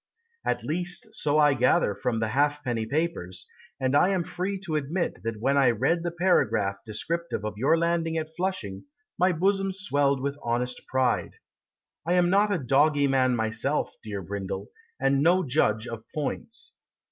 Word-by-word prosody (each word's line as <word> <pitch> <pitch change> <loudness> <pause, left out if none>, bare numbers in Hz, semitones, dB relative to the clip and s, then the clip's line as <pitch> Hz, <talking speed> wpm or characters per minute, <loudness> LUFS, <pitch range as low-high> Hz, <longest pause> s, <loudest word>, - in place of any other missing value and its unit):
At - - -1
least 175 +2 -3
so 150 0 0
I 150 -2 +5
gather 125 -5 +3
from 115 +2 -2
the 110 -1 0
halfpenny 130 -3 0
papers, 115 - -2 0.3
And 130 +1 +1
I 180 - +5
am 190 -3 +1
free 190 +4 -3
to 170 -5 -3
admit 150 - -2
That 110 +1 -4
when 135 +5 +2
I 135 -3 +5
read 135 +9 +1
the 175 - -1
paragraph 160 - +1
Descriptive 165 +3 -4
of 105 -1 -4
your 150 +7 +4
landing 165 -1 0
at 160 0 -4
Flushing 155 - -3 0.3
My 180 +1 +4
bosom 195 +3 +1
swelled 145 -8 +1
with 140 +2 -3
honest 125 +1 -2
pride. 130 -2 0 0.7
I 170 +4 0
am 180 -1 +3
not 205 +2 +4
a 200 - +2
doggy 145 +1 +3
man 130 -2 +3
myself, 115 +6 -1
Dear 100 -3 -5
Brindle, 100 +2 -5 0.3
And 135 0 +2
no 180 +4 +4
judge 125 -6 +1
of 115 -1 -6
points. 225 - -5
145 Hz, 165 wpm, -27 LUFS, 120-170 Hz, 0.7 s, I